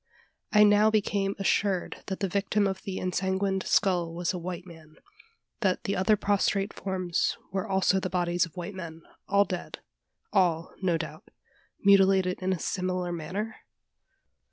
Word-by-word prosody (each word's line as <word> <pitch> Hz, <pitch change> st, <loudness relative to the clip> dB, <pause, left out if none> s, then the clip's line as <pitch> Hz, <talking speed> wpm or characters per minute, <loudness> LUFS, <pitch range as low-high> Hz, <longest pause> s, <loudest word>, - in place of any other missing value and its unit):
I 210 Hz, -1 st, +7 dB
now 210 Hz, +1 st, +5 dB
became 200 Hz, -2 st, 0 dB
assured 195 Hz, -1 st, 0 dB
that 190 Hz, 0 st, -4 dB
the 195 Hz, -, +1 dB
victim 200 Hz, +2 st, +1 dB
of 190 Hz, -1 st, -2 dB
the 190 Hz, -1 st, -5 dB
ensanguined 190 Hz, +1 st, -1 dB
skull 175 Hz, -4 st, +2 dB
was 175 Hz, -1 st, -1 dB
a 180 Hz, -, -4 dB
white 175 Hz, +1 st, -6 dB
man; 160 Hz, -3 st, -14 dB, 0.6 s
that 190 Hz, -2 st, 0 dB
the 200 Hz, -, -1 dB
other 190 Hz, +3 st, +3 dB
prostrate 200 Hz, 0 st, +1 dB
forms 185 Hz, -3 st, -1 dB
were 190 Hz, +2 st, -2 dB
also 190 Hz, 0 st, +2 dB
the 185 Hz, -, -3 dB
bodies 175 Hz, -1 st, +1 dB
of 165 Hz, -, -20 dB
white 175 Hz, +3 st, -5 dB
men, 165 Hz, -3 st, -8 dB, 0.2 s
all 200 Hz, +1 st, +4 dB
dead 180 Hz, -2 st, -5 dB, 0.6 s
all, 170 Hz, -5 st, +2 dB
no 180 Hz, -3 st, +2 dB
doubt, 165 Hz, -, -7 dB, 0.5 s
mutilated 195 Hz, -2 st, +4 dB
in 185 Hz, +1 st, 0 dB
a 185 Hz, -, 0 dB
similar 180 Hz, 0 st, -2 dB
manner? 190 Hz, +7 st, -4 dB
190 Hz, 155 wpm, -28 LUFS, 175-200 Hz, 0.6 s, I